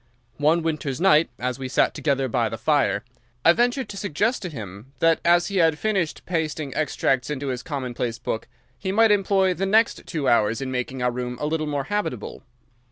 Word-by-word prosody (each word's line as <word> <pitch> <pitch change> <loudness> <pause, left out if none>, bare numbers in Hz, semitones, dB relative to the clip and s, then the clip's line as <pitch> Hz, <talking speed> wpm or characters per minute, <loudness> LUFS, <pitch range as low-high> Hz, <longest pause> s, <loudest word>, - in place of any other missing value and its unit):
One 160 +3 +3
winter's 155 -5 -2
night, 165 -5 +4
as 125 +1 -3
we 130 - -4
sat 130 - +2
together 135 -3 0
by 120 -2 0
the 115 - -5
fire, 125 -4 +1 0.4
I 170 - +8
ventured 245 +4 +1
to 200 - -7
suggest 205 - 0
to 180 - -4
him 110 - -9
that, 165 +3 +3
as 175 +2 +4
he 200 - -2
had 165 -3 +3
finished 190 -7 -1
pasting 155 -4 -2
extracts 135 -3 0
into 140 -1 -3
his 125 -1 -3
common 135 -5 -4
place 115 -1 -3
book, 110 - -4 0.3
he 190 - -2
might 225 +2 +4
employ 195 -2 +3
the 195 +2 -2
next 220 +3 +2
two 155 -6 -2
hours 110 0 +3
in 135 -1 -4
making 125 0 -3
our 125 - +2
room 125 0 -4
a - - -2
little 155 0 -1
more 145 -2 -1
habitable. 170 - -3
150 Hz, 200 wpm, -24 LUFS, 125-185 Hz, 0.4 s, I